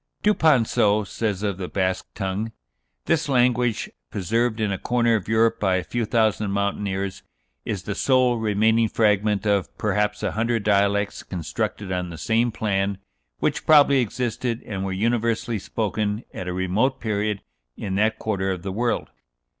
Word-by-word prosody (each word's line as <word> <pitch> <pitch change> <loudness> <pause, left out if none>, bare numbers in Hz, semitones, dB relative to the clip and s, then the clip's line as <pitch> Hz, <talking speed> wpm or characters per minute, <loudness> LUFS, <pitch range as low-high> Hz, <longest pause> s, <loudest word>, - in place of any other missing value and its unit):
Duponceau 125 - +3
says 105 -1 -2
of 100 -2 -2
the 90 - -3
Basque 95 -1 -1
tongue: 100 +3 -2 0.5
"This 160 -2 +1
language, 125 -3 +2 0.2
preserved 115 +4 0
in 105 -2 0
a 95 - -2
corner 120 -1 +2
of 105 - -3
Europe 115 +1 +2
by 95 -3 +2
a 95 - 0
few 120 +3 -2
thousand 110 -3 +1
mountaineers, 100 -1 -2 0.4
is 100 -4 -3
the 100 - -3
sole 130 +1 +3
remaining 110 +1 +2
fragment 105 -2 +2
of, 100 -3 +1
perhaps, 105 0 0
a - - 0
hundred 115 0 0
dialects 100 0 +1
constructed 95 +3 -4
on 90 -1 -2
the 85 - -8
same 115 +6 +1
plan, 100 -2 -1 0.4
which - - -1
probably 140 -3 +6
existed 120 0 -2
and 95 -3 -4
were 95 - -2
universally 115 +2 0
spoken 105 +1 -2
at 90 - -6
a - - -2
remote 100 +9 0
period 105 -2 -1 0.3
in 95 - -4
that 110 +3 +2
quarter 95 -3 -1
of 90 -2 -3
the 95 - -3
world. 115 - -1
105 Hz, 155 wpm, -24 LUFS, 100-115 Hz, 0.5 s, probably